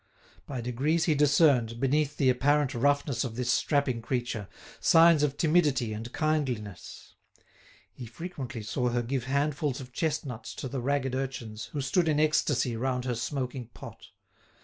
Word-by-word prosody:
By 130 -4 -4
degrees 140 +8 0
he 160 - +3
discerned, 140 -6 +3
beneath 145 +2 +1
the 130 -2 +4
apparent 140 +2 +2
roughness 140 0 +1
of 120 -4 -5
this 125 0 0
strapping 140 -5 +1
creature, 120 -4 -3 0.3
signs 165 -2 +6
of 145 -1 0
timidity 150 -9 +2
and 115 +3 -6
kindliness. 135 - -3 0.8
He 125 - -9
frequently 125 -4 -7
saw 125 +3 -1
her 120 0 0
give 125 +1 -2
handfuls 140 +1 -1
of 125 -2 -10
chestnuts 145 -7 -3
to - - -5
the 130 0 -4
ragged 135 0 0
urchins 125 -5 -4
who 145 - -5
stood 165 +6 +1
in 150 -1 +2
ecstasy 145 -5 +2
round 125 +1 -2
her 125 - -1
smoking 125 0 -4
pot. - - -11
135 Hz, 150 wpm, -28 LUFS, 120-150 Hz, 0.8 s, signs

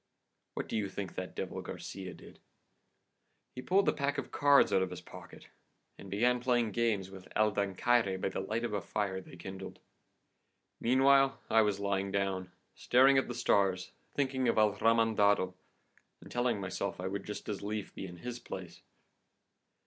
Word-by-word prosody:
What - - -3
do - - -4
you 105 -3 -1
think 95 -2 -5
that - - -6
devil - - -4
Garcia 95 -1 -7
did? - - -15 1.1
He 125 - -6
pulled 190 +9 +2
a - - +4
pack 140 0 -1
of - - -4
cards 145 -1 +5
out 95 - +4
of 95 - 0
his 90 - -7
pocket - - -13 0.5
and 100 - -11
began 120 +6 +2
playing 120 -3 +1
games 105 -5 0
with 95 -1 -11
El 110 0 +3
Dancaire 100 +1 +1
by 95 - -1
the - - -4
light 115 +2 -2
of 120 -3 -2
a 100 - -1
fire 95 -2 -2
they 90 - -13
kindled. 95 +2 -8 1.0
Meanwhile 135 +2 +4
I 110 0 +6
was 105 -2 +1
lying 100 -1 -1
down, 95 -2 -1 0.2
staring 135 +2 +5
at - - -2
the 120 - -5
stars, 95 -6 +1 0.2
thinking 130 -2 0
of - - +2
El 105 -2 +4
Remendado, 105 -3 +3 0.7
and - - -14
telling 120 -3 0
myself 95 -2 -3
I 90 - -4
would 100 +1 -3
just 105 -1 -7
as 105 -2 -3
lief 105 0 -4
be 95 - -6
in 90 -1 -10
his 120 +5 -6
place. 95 -7 -8
105 Hz, 175 wpm, -32 LUFS, 95-120 Hz, 1.1 s, I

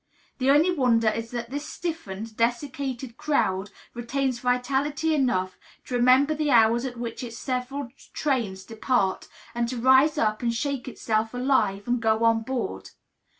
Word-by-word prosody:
The 260 +1 +2
only 300 +6 +5
wonder 240 -8 +3
is 230 +1 -4
that 240 0 -5
this 290 +2 -4
stiffened, 225 - -5
desiccated 250 +1 -2
crowd 195 -10 0 0.2
retains 250 +1 -2
vitality 270 +6 0
enough 190 -11 0 0.3
to - - -8
remember 255 +5 +4
the 305 -1 -1
hours 235 0 +4
at 245 -2 -5
which 235 +1 -5
its 230 -1 -7
several 255 +1 -3 0.2
trains 230 -10 -1
depart, 225 -3 0 0.3
and 235 0 -1
to 255 - -4
rise 260 +5 +5
up 215 -1 +1
and 235 -1 +1
shake 275 +2 -3
itself 225 -2 -1
alive 245 -6 +1
and 240 0 0
go 220 0 +2
on 230 0 +4
board. 220 - -4
245 Hz, 150 wpm, -25 LUFS, 230-275 Hz, 0.3 s, only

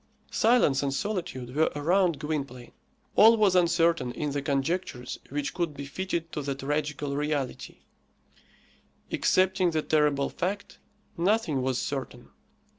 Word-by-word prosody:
Silence 220 - +3
and 135 -1 -1
solitude 140 - -4
were 160 +1 +3
around 170 +2 +2
Gwynplaine. 140 -5 -4 0.4
All 225 +2 +7
was 205 -4 +3
uncertain 170 -6 +3
in 145 +3 -3
the 145 0 -2
conjectures 140 -1 -2
which 145 +1 -3
could 170 -5 -2
be 140 0 -6
fitted 170 +2 -3
to 150 - -3
the 140 -1 -3
tragical 145 0 -2
reality; 145 -3 -3 1.3
excepting 185 -1 +2
the 160 -2 -1
terrible 150 -3 +2
fact, 195 +3 -4 0.4
nothing 175 -6 +1
was 130 -1 0
certain. 130 -3 -5
150 Hz, 125 wpm, -27 LUFS, 140-180 Hz, 1.3 s, All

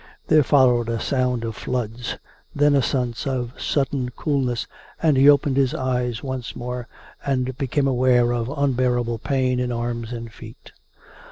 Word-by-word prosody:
There 155 -1 +6
followed 125 -5 +3
a 115 -1 -1
sound 125 -2 0
of 115 -1 -4
floods; 120 0 -3 0.4
then 145 0 +4
a 140 - +4
sense 125 -1 -2
of 125 -2 -2
sudden 135 -3 0
coolness, 135 -6 -1 0.3
and 155 -3 +3
he 135 +2 +6
opened 140 -1 +4
his 135 -2 +2
eyes 125 -2 -1
once 130 -3 -5
more, 125 0 -5 0.4
and 130 -2 -1
became 140 +1 0
aware 125 -2 +3
of 120 0 -2
unbearable 125 -4 0
pain 130 -2 0
in 125 0 -1
arms 120 -1 -3
and 115 -2 -7
feet. 110 0 -13
125 Hz, 155 wpm, -22 LUFS, 120-135 Hz, 0.4 s, There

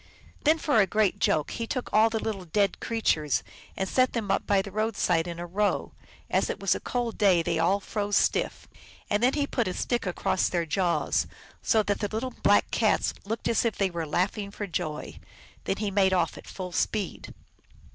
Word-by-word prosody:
Then, 310 +2 +5
for 290 -8 +3
a 195 - +2
great 210 0 +1
joke, 155 -2 +1
he 230 -1 -4
took 255 0 -4
all 220 +1 +5
the 225 - -2
little 210 -4 -3
dead 195 +3 +1
creatures 155 - 0 0.3
and 190 - -1
set 255 +5 +2
them 215 -5 -1
up 195 - 0
by 195 -1 +3
the 200 - -8
road 215 +1 -1
side 165 -1 +2
in 170 -1 -5
a 175 - -5
row; 200 +4 -1 0.3
as - - +1
it - - -3
was - - +2
a - - -3
cold 240 -2 -3
day 190 -5 +4
they 165 0 0
all 185 +5 +3
froze 205 0 -2
stiff, - - +1 0.4
and 205 +1 +2
then 250 +2 +4
he 290 -1 +1
put 240 -6 -1
a 185 - -3
stick 240 -5 -1
across 180 +1 0
their 170 -2 0
jaws, 175 +1 +1 0.3
so 220 -1 +3
that 205 -1 -1
the 205 - -1
little 235 +4 -2
Black 205 0 +4
Cats 220 -2 +2
looked 225 +3 -3
as 230 - +2
if 230 -3 -1
they 195 -2 +1
were 165 -2 -3
laughing 195 +5 -1
for 205 +1 -5
joy. 155 -4 -4 0.5
Then 195 - -1
he 210 -1 -2
made 190 -1 +3
off 175 -3 +1
at - - -12
full 185 -2 -6
speed. 200 +2 -2
200 Hz, 210 wpm, -27 LUFS, 180-220 Hz, 0.5 s, Then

